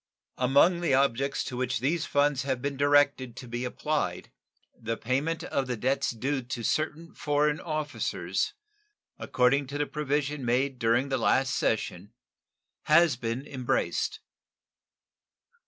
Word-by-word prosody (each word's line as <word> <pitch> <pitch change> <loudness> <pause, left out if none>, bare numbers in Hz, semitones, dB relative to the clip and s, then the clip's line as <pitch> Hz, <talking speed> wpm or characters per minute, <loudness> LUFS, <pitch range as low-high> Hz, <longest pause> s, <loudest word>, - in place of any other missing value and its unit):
Among 140 +8 +4
the 155 -6 +2
objects 135 0 +1
to 125 - -6
which 130 0 -1
these 155 +6 0
funds 145 -2 +2
have 135 -1 -2
been 140 +2 -3
directed 145 -3 +3
to 125 - -9
be 120 +1 -4
applied, 150 +4 -2 0.4
the 115 0 -4
payment 140 +7 -1
of 135 -2 -2
the 125 -2 -2
debts 130 +5 0
due 130 +4 -2
to 120 -1 -6
certain 155 +6 -2
foreign 150 0 +1
officers, 125 - -2 0.6
according 135 +2 +2
to 140 +2 -5
the 145 - 0
provision 145 -1 -2
made 125 +2 0
during 120 +4 +2
the 130 -1 0
last 130 +3 +2
session, - - -2 0.7
has 155 -2 +5
been 115 +3 -4
embraced. 130 -4 -1
135 Hz, 135 wpm, -28 LUFS, 125-145 Hz, 0.7 s, has